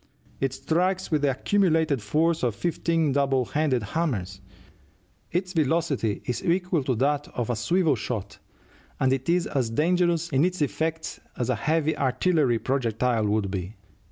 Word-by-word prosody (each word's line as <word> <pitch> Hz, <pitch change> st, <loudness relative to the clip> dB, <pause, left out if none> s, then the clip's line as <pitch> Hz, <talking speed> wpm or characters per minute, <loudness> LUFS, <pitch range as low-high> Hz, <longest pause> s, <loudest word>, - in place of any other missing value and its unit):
It 135 Hz, -1 st, 0 dB
strikes 180 Hz, +7 st, -1 dB
with 155 Hz, -2 st, +2 dB
the 145 Hz, -, +3 dB
accumulated 160 Hz, -, +1 dB
force 160 Hz, +10 st, +1 dB
of 120 Hz, -4 st, 0 dB
fifteen 165 Hz, -, 0 dB
double 135 Hz, -2 st, +2 dB
handed 140 Hz, -4 st, 0 dB
hammers; 100 Hz, -, -2 dB, 0.9 s
its 180 Hz, +2 st, -2 dB
velocity 155 Hz, -, 0 dB
is 125 Hz, -, -3 dB
equal 180 Hz, -3 st, +1 dB
to 130 Hz, -, +1 dB
that 145 Hz, +4 st, 0 dB
of 120 Hz, -1 st, -1 dB
a -, -, 0 dB
swivel 155 Hz, -, +2 dB
shot, 105 Hz, -4 st, -5 dB, 0.6 s
and 130 Hz, 0 st, +3 dB
it 135 Hz, +3 st, -3 dB
is 175 Hz, +1 st, +3 dB
as 130 Hz, -5 st, -1 dB
dangerous 170 Hz, +5 st, +1 dB
in 135 Hz, -1 st, +2 dB
its 180 Hz, +1 st, 0 dB
effects 160 Hz, +2 st, -2 dB, 0.2 s
as 120 Hz, -, 0 dB
a -, -, +1 dB
heavy 160 Hz, +1 st, 0 dB
artillery 135 Hz, -1 st, +2 dB
projectile 120 Hz, -3 st, 0 dB
would 105 Hz, -2 st, 0 dB
be. 95 Hz, +2 st, -4 dB
145 Hz, 155 wpm, -26 LUFS, 120-165 Hz, 0.9 s, the